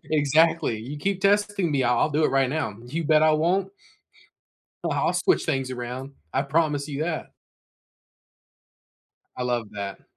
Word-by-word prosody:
Exactly. 150 -4 +3
"You 140 +6 -7
keep 195 +2 -1
testing 200 -3 +2
me, 135 -2 +2
I 125 - +3
I'll 155 - +2
do 155 +2 +1
it - - +2
right 135 -1 +2
now. 145 -9 -2
You 155 +6 -4
bet 155 0 +4
I 155 0 +5
won't." 180 +5 +1 1.2
Oh, - - 0
I'll - - +1
switch 375 - +2
things 135 -1 -1
around, 125 +2 -6 0.2
I 135 - +2
promise 150 0 0
you 145 +2 -2
that. 160 -2 -4 2.0
I 125 - -3
love 120 -3 -1
that. 100 -1 -6
150 Hz, 160 wpm, -25 LUFS, 130-165 Hz, 2.0 s, I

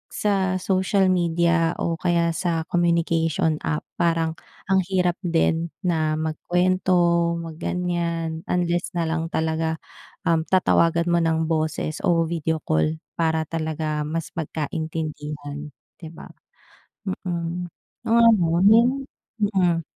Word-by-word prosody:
sa 190 -3 +1
social 190 0 +2
media 170 -1 +2
o 165 -1 -2
kaya 170 -1 +2
sa 165 -1 -1
communication 165 -2 +1
app, 75 0 -2 0.2
parang 165 -1 +2 0.4
ang 190 0 +4
hirap 180 -2 +1
din 165 0 +1 0.2
na 160 -3 +1
magkuwento, 175 +1 +1
mag 165 -2 -6
ganiyan, 170 -2 -2
unless 175 0 0
nalang 165 -1 -1
talaga, 160 0 -1 0.5
um, 165 -1 +1
tatawagan 170 -2 +3
mo 170 - +3
ng 160 -1 +1
boses 155 0 -1
o 170 -2 +3
video 160 -1 -2
call 80 0 +1 0.2
para 160 -1 +1
talaga 155 -2 -2
mas 165 0 -3
magkaintindihan, 150 -2 -4 0.3
'di 165 - -8
ba. - - -11 0.8
Mm, 175 -1 -3 0.4
oo 230 0 +6
nga 170 -2 +1
'no. 220 +3 +8 0.6
mm. 185 -5 +2
165 Hz, 115 wpm, -23 LUFS, 160-175 Hz, 0.8 s, no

